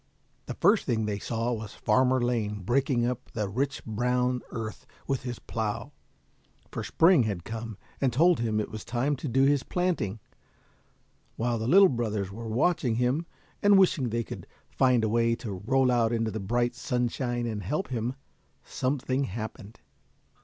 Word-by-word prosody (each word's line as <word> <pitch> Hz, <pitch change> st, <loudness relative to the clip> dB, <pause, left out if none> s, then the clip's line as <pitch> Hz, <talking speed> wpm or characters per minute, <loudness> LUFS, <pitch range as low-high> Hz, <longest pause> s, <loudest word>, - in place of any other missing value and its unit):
The -, -, -4 dB
first 210 Hz, 0 st, +3 dB
thing 110 Hz, -4 st, +1 dB
they 105 Hz, -1 st, -2 dB
saw 115 Hz, +2 st, -1 dB
was 110 Hz, -2 st, -6 dB
Farmer 130 Hz, +4 st, +3 dB
Lane 110 Hz, -4 st, -1 dB
breaking 125 Hz, +2 st, +1 dB
up 125 Hz, +1 st, -3 dB
the 105 Hz, -3 st, -1 dB
rich 135 Hz, +7 st, -2 dB
brown 125 Hz, +3 st, 0 dB
earth 110 Hz, -1 st, -6 dB, 0.2 s
with 135 Hz, -2 st, -1 dB
his 125 Hz, -2 st, -5 dB
plough, 115 Hz, +4 st, -4 dB, 0.8 s
for -, -, -4 dB
Spring 165 Hz, -3 st, +5 dB
had 100 Hz, -5 st, -3 dB
come, 110 Hz, 0 st, -6 dB, 0.2 s
and 135 Hz, -2 st, +3 dB
told 170 Hz, +8 st, +4 dB
him 110 Hz, -2 st, 0 dB
it 105 Hz, -, -3 dB
was 110 Hz, -1 st, -6 dB
time 125 Hz, +5 st, 0 dB
to 150 Hz, -, -5 dB
do 135 Hz, +2 st, +3 dB
his 140 Hz, 0 st, +4 dB
planting, 165 Hz, -, -1 dB, 1.2 s
while 120 Hz, 0 st, -1 dB
the 110 Hz, -, -2 dB
little 195 Hz, +8 st, +7 dB
brothers 110 Hz, -, -2 dB
were 115 Hz, +2 st, -7 dB
watching 125 Hz, 0 st, +1 dB
him, 125 Hz, +8 st, 0 dB, 0.3 s
and 205 Hz, -1 st, +6 dB
wishing 180 Hz, -9 st, +3 dB
they 115 Hz, +1 st, -1 dB
could -, -, -8 dB, 0.2 s
find 125 Hz, -3 st, +3 dB
a -, -, +2 dB
way 115 Hz, +1 st, +2 dB
to 105 Hz, -6 st, -6 dB
roll 130 Hz, 0 st, +3 dB
out 115 Hz, -2 st, +2 dB
into 115 Hz, -1 st, 0 dB
the 110 Hz, -, -4 dB
bright 120 Hz, +5 st, 0 dB
sunshine 120 Hz, -1 st, -1 dB
and 110 Hz, -3 st, -3 dB
help 150 Hz, -, -2 dB
him, 125 Hz, 0 st, -2 dB, 0.5 s
something 130 Hz, 0 st, -1 dB
happened. 110 Hz, +1 st, -7 dB
120 Hz, 165 wpm, -28 LUFS, 110-130 Hz, 1.2 s, little